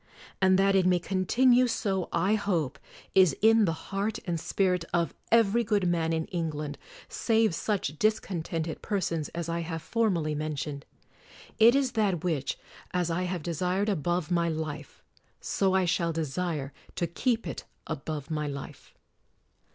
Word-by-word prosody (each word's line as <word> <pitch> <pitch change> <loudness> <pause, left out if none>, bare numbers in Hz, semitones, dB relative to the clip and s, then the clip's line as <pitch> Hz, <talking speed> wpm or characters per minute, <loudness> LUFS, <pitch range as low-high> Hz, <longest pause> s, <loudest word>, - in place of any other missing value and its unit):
And 190 0 +5
that 195 +1 +4
it 190 -2 +4
may 180 -1 +4
continue 240 +8 +3
so, 195 -6 -1
I 190 +5 +2
hope 180 - 0 0.3
is 185 -7 +5
in 220 0 +5
the 165 +1 -4
heart 205 +3 -1
and 170 -3 -1
spirit 180 0 +1
of 170 -1 0 0.2
every 230 0 +4
good 205 -4 +1
man 165 -2 +1
in 160 -1 0
England, 150 -5 -3 0.3
save 225 -4 +2
such 165 -6 -2
discontented 170 -6 -1
persons 170 -7 -1
as 170 -1 -3
I 170 0 -1
have 165 -1 -4
formerly 185 -10 0
men 155 0 -2
tioned. 140 0 -4 0.8
It 230 +3 +7
is 275 -2 +2
that 205 -8 0
which, 155 -6 -1 0.3
as 175 -2 -1
I 180 +2 0
have 175 -4 -3
desired 180 +5 0
above 175 -2 -1
my 170 -1 +2
life, 155 -2 -5 0.4
so 190 -1 +1
I 190 -1 +3
shall 170 -1 +1
desire 155 -2 -3 0.2
to 175 - 0
keep 225 +7 -1
it 165 - -6 0.2
above 150 +1 -5
my 150 -1 -1
life. 140 -1 -8
175 Hz, 155 wpm, -28 LUFS, 160-200 Hz, 0.8 s, It